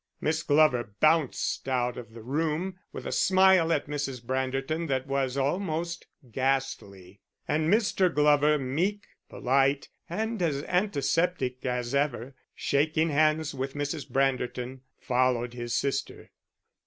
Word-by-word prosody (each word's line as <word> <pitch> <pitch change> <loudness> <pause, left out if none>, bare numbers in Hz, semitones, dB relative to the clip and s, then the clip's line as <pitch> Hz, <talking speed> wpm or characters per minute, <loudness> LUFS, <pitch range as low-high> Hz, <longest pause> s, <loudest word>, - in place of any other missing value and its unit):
Miss 160 +1 0
Glover 145 -9 +2
bounced 155 -3 +1
out 125 -1 0
of 115 -2 -10
the 115 - -10
room 160 +7 -2
with - - -8
a - - -3
smile 190 -3 +4
at 150 -3 +1
Mrs. 145 -3 -3
Branderton 135 +6 -2
that 130 -2 -1
was 135 -1 -1
almost 170 +3 -2 0.2
ghastly; 105 -8 -2 0.3
and 155 +2 +1
Mr. 200 -4 +3
Glover, 150 0 +4
meek, 170 +10 -1 0.2
polite, 135 +2 +1 0.2
and 220 +4 -2
as 145 -5 0
antiseptic 165 -7 0
as 125 0 -2
ever, 140 -2 -1 0.2
shaking 155 +3 +1
hands 155 +1 +2
with 135 +1 -4
Mrs. 145 0 -3
Branderton, 130 -1 -1 0.2
followed 125 -1 +1
his 120 -1 -4
sister. 135 0 -3
140 Hz, 125 wpm, -28 LUFS, 130-160 Hz, 0.3 s, smile